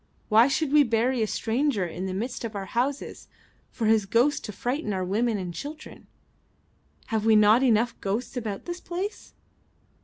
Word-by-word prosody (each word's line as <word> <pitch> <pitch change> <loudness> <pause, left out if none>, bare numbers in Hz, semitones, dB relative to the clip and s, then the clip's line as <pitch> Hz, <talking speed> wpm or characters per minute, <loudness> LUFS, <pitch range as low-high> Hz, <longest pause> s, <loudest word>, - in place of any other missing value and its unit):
Why 225 +3 +6
should 285 +1 -1
we 300 - +7
bury 240 0 +1
a 220 - +1
stranger 230 -2 0
in 175 +3 -5
the 185 - -4
midst 240 +6 -4
of 225 -2 -5
our 195 -1 -4
houses 260 +7 -3 0.4
for 230 - -4
his 215 -2 +3
ghost 260 +8 +2
to 210 - -5
frighten 245 +2 -3
our 185 -1 -2
women 220 +4 0
and 180 -3 -5
children? 290 - -9 1.1
Have 220 -1 +1
we 220 0 +5
not 215 +3 +6
enough 235 -2 +3
ghosts 210 +7 -3
about 220 -5 -4
this 350 0 -5
place?" 370 +5 -6
230 Hz, 175 wpm, -26 LUFS, 210-265 Hz, 1.1 s, we